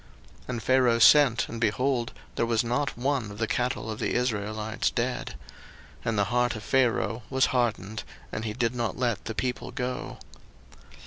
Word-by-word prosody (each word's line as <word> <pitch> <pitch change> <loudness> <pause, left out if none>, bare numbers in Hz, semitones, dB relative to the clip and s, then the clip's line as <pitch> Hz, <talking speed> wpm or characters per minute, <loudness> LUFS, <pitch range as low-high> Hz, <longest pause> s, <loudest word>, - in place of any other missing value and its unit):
02:009:007 - - -22
And 120 -3 -3
Pharaoh 130 -3 +4
sent, 130 0 +6
and, 115 0 -7
behold, 125 +2 +1 0.2
there - - +1
was 115 0 +2
not 125 +3 -1
one 130 -3 0
of 100 - -9
the 115 - 0
cattle 120 -1 -1
of 110 - -6
the - - -1
Israelites 110 -2 -1
dead. 125 +1 -2 0.7
And 115 -2 -1
the 100 - +4
heart 125 -1 +2
of 110 - -7
Pharaoh 120 -3 +1
was 130 0 +3
hardened, 110 -4 -1 0.3
and 110 - -4
he 110 -2 -3
did 115 0 0
not 120 -2 -2
let 120 -6 -1
the 110 - -4
people 125 +2 -2
go. 125 0 -4
120 Hz, 175 wpm, -27 LUFS, 110-125 Hz, 0.7 s, sent